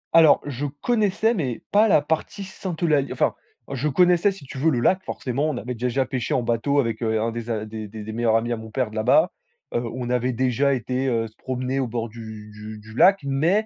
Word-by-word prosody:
Alors 160 -2 +7
je 145 0 -3
connaissais, 215 - +1
mais 135 - -3
pas 215 +2 +5
la 170 - +5
partie 160 +6 -2
Sainte-Eulalie 165 -6 -1
enfin, - - +1 0.4
je 140 +2 -1
connaissais 180 +6 +4
si 190 -7 -11
tu 135 - -9
veux 160 - +3
le 130 -6 +1
lac. 185 +10 +2
Forcément, 140 +5 -2
on 140 - -2
avait 125 +3 -4
déjà 125 +2 0
pêché 125 -2 -2
en 125 - +1
bateau 120 +5 +1
avec, 115 -4 -1
heu, 110 -1 +1
un 115 +1 0
des 120 0 -6
a 110 -1 -2
des 110 0 -6
des 105 +1 -8
des 110 - -6
meilleurs 115 -1 +2
amis 115 +1 +1
à 120 - 0
mon 110 0 -9
père, 120 0 -1
de - - -10
là-bas. 120 - +4 0.4
Heu, 120 - +1
on 125 -1 -4
avait 125 +1 +1
déjà 130 +3 +2
été 130 +2 -2
heu, 115 -3 0
se 110 - -20
promener 130 +1 -2
au 130 - 0
bord 115 0 -3
du 110 -2 -9
du 105 +1 -9
du 110 +1 -13
lac, 195 +8 +5
mais 160 +10 +2
125 Hz, 235 wpm, -23 LUFS, 115-150 Hz, 0.4 s, Alors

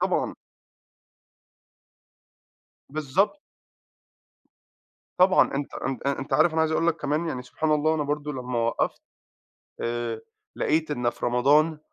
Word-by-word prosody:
طبعًا. - - 0 2.6
بالضبط. 160 - 0 1.8
طبعًا. 185 -5 +5
أنت 140 0 -3
أنت 135 0 -4
آآ 140 - 0
أنت 135 0 -6
عارف 155 +4 +4
أنا 160 - +1
عايز 160 0 +2
أقول 165 - +1
لك 170 -1 +2
كمان 150 +3 -1
يعني 125 -5 -4
سبحان 155 +5 -2
الله 155 +1 +2
أنا 155 - 0
برضه 150 +1 -2
لمّا 125 -2 -3
وقّفت، 115 0 -1 0.8
آآ 120 -1 -2 0.4
لقيت 155 0 +1
إن 120 -4 0
في - - -4
رمضان 145 +6 +3
150 Hz, 125 wpm, -26 LUFS, 125-160 Hz, 2.6 s, طبعًا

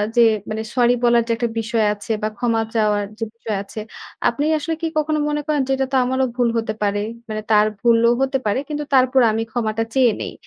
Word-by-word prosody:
যে 240 - +5 0.3
মানে 220 +1 -3
সরি 245 -1 +4
বলার 235 0 +5
যে 230 - -1
একটা 235 +1 -1
বিষয় 225 0 0
আছে 205 +2 -7
বা - - +2
ক্ষমা 230 -1 +1
চাওয়ার 210 -2 +1
যে - - -2
বিষয় 220 -3 -4
আছে। 200 - -9 0.5
আপনি 265 +5 -2
আসলে 325 +2 -3
কি 330 - 0
কখনো 310 0 +1
মনে 295 0 -1
করেন 300 -2 +1
যে - - -1
এটা 265 0 0
তো - - +3
আমারও 260 +1 +1
ভুল 245 -2 +2
হতে 225 -1 -2
পারে? 205 0 +1 0.3
মানে 215 0 -3
তার 210 0 +5
ভুলও 235 +1 +4
হতে 270 0 +1
পারে। 210 +4 +1
কিন্তু 295 0 -3
তারপরও 255 -1 +4
আমি 225 +1 -1
ক্ষমাটা 225 -1 -1
চেয়ে 255 -4 +5
নেই। - - -5
235 Hz, 220 wpm, -20 LUFS, 220-265 Hz, 0.5 s, যে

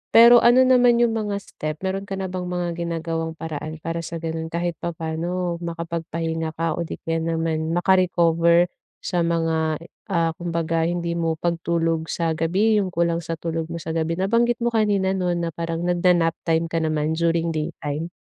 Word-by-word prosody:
pero 235 +1 +9
ano 240 +2 +6
naman 245 -2 +5
yung 235 - +3
mga 210 -2 -2
step 155 0 -5
meron 195 +1 -2
ka 195 - -3
na 190 -1 -4
bang 180 -1 -4
mga 180 -1 -2
ginagawang 165 -1 -3
paraan 155 -1 -5
para 165 0 -2
sa 165 0 -6
ganun 160 0 -4
kahit 170 +1 -1
papaano 170 +1 -3
makapagpahinga 165 -1 -3
ka 165 0 -1
o 170 - -2
di - - -5
kaya 165 0 -1 0.2
naman 160 0 -1
maka-recover 175 -2 +3 0.3
sa 175 -3 0
mga, 165 -2 0 0.3
ah, 165 -3 +1
kumbaga 165 -1 -1
hindi 170 -1 -2
mo 165 -1 -1
pagtulog 165 -1 -1
sa 165 -1 0
gabi, 195 +7 +2
yung 190 - -2
kulang 170 -1 0
sa 165 0 -4
tulog 165 0 -3
mo 170 - -4
sa 160 -1 -5
gabi. 165 +1 -1
Nabanggit 230 +5 +2
mo 240 - 0
kanina 200 -3 +2
'no 185 -2 -1
na 170 -1 -2
parang 165 +1 -3
nagna-nap 175 -2 +3
time 165 0 +1
ka 165 0 -2
naman 155 0 0
during 165 0 +1
daytime. 155 0 -3
170 Hz, 175 wpm, -23 LUFS, 165-180 Hz, 0.3 s, pero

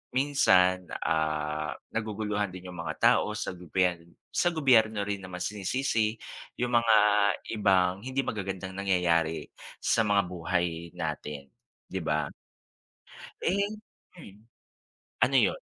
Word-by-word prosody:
minsan, 95 -10 +3 0.2
ah, 75 -1 -1 0.2
naguguluhan 105 -2 -1
din 90 0 -9
yung - - -10
mga 85 - -4 0.2
tao 105 - -2
sa - - -3
gobyern 90 0 0 0.3
sa - - +1
gobyerno 110 -9 +3
rin 100 0 -3
naman 90 -1 -6
sinisisi 110 +2 0 0.4
yung 125 0 0
mga 115 -2 +4 0.6
ibang 95 -1 +3
hindi 130 +1 -1
magagandang 95 -3 -4
nangyayari 90 -4 +1 0.3
sa 115 - +2
mga 100 -1 +3
buhay 85 -1 -2
natin, 70 -3 -5 0.4
'di 95 - -2
ba? 75 -1 -1 1.1
Eh. 200 +3 +1 0.5
Mm. 105 - -14 0.8
Ano - - +4
yun? - - +3
95 Hz, 115 wpm, -28 LUFS, 85-110 Hz, 1.1 s, mga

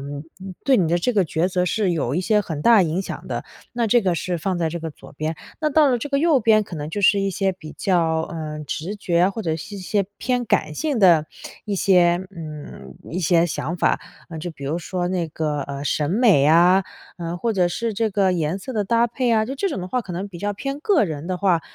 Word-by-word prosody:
嗯， 140 +2 -6 0.4
对 270 -2 +4
你 170 - +2
的 170 - +2
这 245 +8 0
个 200 -3 +3
抉 160 +2 0
择 180 -1 0
是 205 -1 +1
有 140 -6 -1
一 175 - +1
些 210 +1 +3
很 160 -6 -5
大 230 -3 +6
影 175 +2 0
响 - - -7
的， - - -3 0.3
那 235 -1 +1
这 240 +3 +4
个 185 -5 +1
是 175 +1 -2
放 185 +2 -1
在 165 -2 0
这 170 - -4
个 160 -1 -4
左 - - -15
边。 155 +2 -3 0.2
那 305 - +2
到 300 -1 +4
了 245 - +1
这 290 - -5
个 280 -1 +1
右 310 -4 +3
边 215 -1 +4
可 180 - -9
能 150 -1 -5
就 200 +5 -4
是 200 +2 +5
一 195 - 0
些 190 0 0
比 155 -4 -11
较， 165 -4 +1
呃， 155 -2 -5
直 170 +8 -4
觉， 175 -1 +2
或 215 +3 -5
者 160 -2 -1
是 185 +6 -8
一 - - -7
些 200 +1 0
偏 250 0 -1
感 155 -5 +1
性 295 - -1
的 170 -6 +5 0.4
一 205 - -1
些 180 -1 +3
嗯， 155 -3 -9 0.2
一 175 - -3
些 170 0 +3
想 165 0 -3
法。 - - +1 0.3
呃， 160 - -6
就 175 +3 -5
比 140 - -10
如 155 +5 -1
说 175 +1 -3
那 180 -3 -1
个， 150 -2 -2
呃， 140 +1 -6
审 150 +2 0
美 205 - +4
啊， 175 +4 +5 0.4
呃， 170 0 -4
或 225 +5 -1
者 180 -3 +2
是 230 +4 -2
这 220 +2 0
个 195 -1 +2
颜 165 +1 -1
色 255 +7 -7
的 210 -3 0
搭 235 +3 +3
配 245 +1 -1
啊， 220 -1 +3
就 265 +5 -5
这 390 +8 -1
种 285 - -4
的 180 - -6
话， 250 - 0
可 195 -6 -8
能 190 +4 -4
比 175 - -10
较 205 +3 -2
偏 275 +7 -4
个 395 - +3
人 155 -2 -5
的 185 0 -2
话， 180 -4 +2
180 Hz, 270 characters per minute, -22 LUFS, 160-215 Hz, 0.4 s, 大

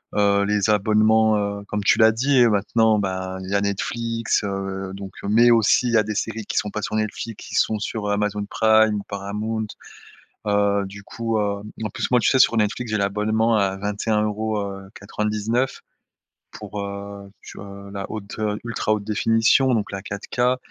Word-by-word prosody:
heu, 100 -1 +3
les 105 0 +1
abonnements, 110 +1 +3
heu, 100 0 -3
comme 105 0 -2
tu - - +4
l'as 110 0 +7
dit 125 +2 +3
maintenant, 110 +1 +2
ben, 95 -1 -3
il 95 - -7
y - - +1
a 100 - +2
Netflix, 115 +3 -1
heu, 95 -1 -4
donc 95 -1 -8
heu - - -4
mais 115 +3 +5
aussi, 115 +2 +4
il 120 - -1
y - - +5
a 110 - +4
des 105 - -4
séries 110 0 -3
qui - - -5
sont 105 - +1
pas 105 - -4
sur - - -3
Netflix, 110 +1 -4
qui - - -7
sont 110 - +2
sur 105 0 -3
Amazon 105 0 -1
Prime 110 -1 +4
ou 100 - -7
Paramount, 105 +2 -3 0.8
heu, 100 -1 +2
du 100 +1 -10
coup, 115 0 -2
heu, 100 -1 -2 0.2
en - - -1
plus - - -3
moi 125 -1 +4
tu - - +2
sais? 130 - +3
Sur 120 -2 +5
Netflix 110 +2 -1
j'ai 105 - 0
l'abonnement 110 +3 +1
à 95 -2 +1
vingt 100 +1 -3
et - - +1
un 105 -1 +3
euros, 110 0 -1
heu, 100 -1 -5 0.2
quatre 105 +1 -5
vingt 105 - +1
dix 105 0 -4
neuf 125 +3 0 0.7
pour, 105 - -7
heu, 100 0 -7
tu - - -11
vois? 100 0 -10
La 100 -1 -6
haute, 105 -1 -7
heu, 105 -1 -1
ultra 115 -2 -1
haute 105 -1 -1
définition 115 +5 +3
donc 105 -3 -2
la 100 - -4
4K, 120 +6 -1
105 Hz, 210 wpm, -22 LUFS, 100-110 Hz, 0.8 s, l'as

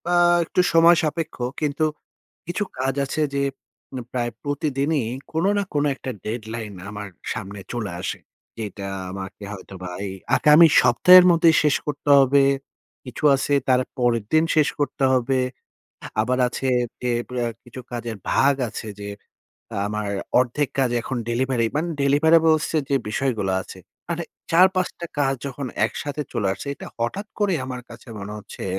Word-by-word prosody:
আ - - +4 0.3
একটু 180 - +1
সময় 165 +1 +7
সাপেক্ষ, 160 +1 -2 0.3
কিন্তু 150 +1 +1 0.6
কিছু 180 +4 -2
কাজ 135 +1 0
আছে 155 +3 -2
যে, 140 - +1 0.5
উম 130 - -5
প্রায় 120 -1 -1
প্রতিদিনই 145 -1 0 0.3
কোন 160 +2 0
না 200 - +1
কোন 145 0 +2
একটা 130 - -6
deadline 110 -2 -5
আমার 105 0 -6 0.2
সামনে 100 -2 -6
চলে 110 -6 -3
আসে। 95 - -3 0.4
যেটা 105 -2 -5 0.2
আমাকে 95 +1 -7
হয়তোবা 95 -2 -8 0.2
এই 95 - -5 0.2
আগামী 150 +4 +7
সপ্তাহের 180 +9 +7
মধ্যেই 165 -1 +5
শেষ 150 -2 +3
করতে 145 0 -2
হবে। 135 +1 +5 0.6
কিছু 125 - -9
আছে 135 +1 -1 0.2
তার 130 -1 +4 0.2
পরের 120 -3 +1
দিন 155 +1 +5
শেষ 150 -1 +4
করতে 145 -1 -1
হবে। 130 +1 +1 0.8
আবার 125 +3 0
আছে 130 +2 -3 0.3
যে, 125 - 0 0.2
ব্য - - -12 0.3
কিছু 125 +2 -9
কাজের 120 -2 -4 0.2
ভাগ 140 +1 +4
আছে 110 +1 -7
যে, 100 - -6 0.8
আমার 105 -1 -3 0.3
অর্ধেক 130 +3 +1
কাজ 130 -3 +2
এখন 130 - -4
delivery 120 0 +1
মান 155 +3 0 0.2
deliverables 160 +2 +4
এর 155 - +2
যে, 140 - +4
বিষয়গুলা 110 -5 -1
আছে 95 - -12 0.3
মানে 170 0 -2 0.3
৪-৫ 185 +2 +4
টা 170 - -4
কাজ 135 -1 +2
যখন 140 0 -5 0.2
একসাথে 145 +5 -4
চলে 110 -5 0
আসছে, 100 +9 -7
এটা - - -10
হঠাৎ 120 - -2
করে 205 -3 +2
আমার 125 -1 -5
কাছে 115 +1 -13
মনে 100 +1 -6
হচ্ছে 105 - -9
135 Hz, 155 wpm, -23 LUFS, 115-155 Hz, 0.8 s, সময়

